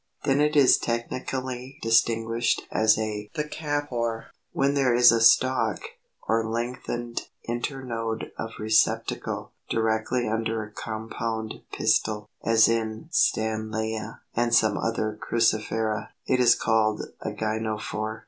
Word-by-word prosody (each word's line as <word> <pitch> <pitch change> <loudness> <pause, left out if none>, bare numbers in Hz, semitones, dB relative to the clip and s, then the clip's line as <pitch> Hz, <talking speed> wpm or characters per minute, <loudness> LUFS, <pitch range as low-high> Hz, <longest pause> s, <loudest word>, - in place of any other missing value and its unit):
Then 140 0 +2
it 150 0 +2
is 140 -3 +6
technically 130 +2 -4
distinguished 115 +1 +2
as 110 0 +4
a 105 -1 -3
THECAPHORE. 145 -7 -3 0.2
When 140 +1 +1
there 135 -4 +2
is 120 -1 +8
a 115 0 +2
stalk, 130 +3 +4 0.5
or 115 0 +2
lengthened 120 +1 -4 0.2
internode 120 -2 -3
of 115 0 -5
receptacle, 110 0 0 0.2
directly 110 +2 0
under 110 0 -1
a 105 - -11
compound 110 0 -5
pistil, 105 -1 +1 0.2
as 115 -1 +5
in 115 +5 -2
Stanleya 110 -4 -1
and 120 0 +2
some 110 -2 +4
other 110 -2 -2
Cruciferæ, 110 -2 0 0.2
it 130 - +1
is 125 -2 +6
called 110 -1 +1 0.2
a - - -3
GYNOPHORE. 110 0 -3
115 Hz, 115 wpm, -26 LUFS, 110-120 Hz, 0.5 s, is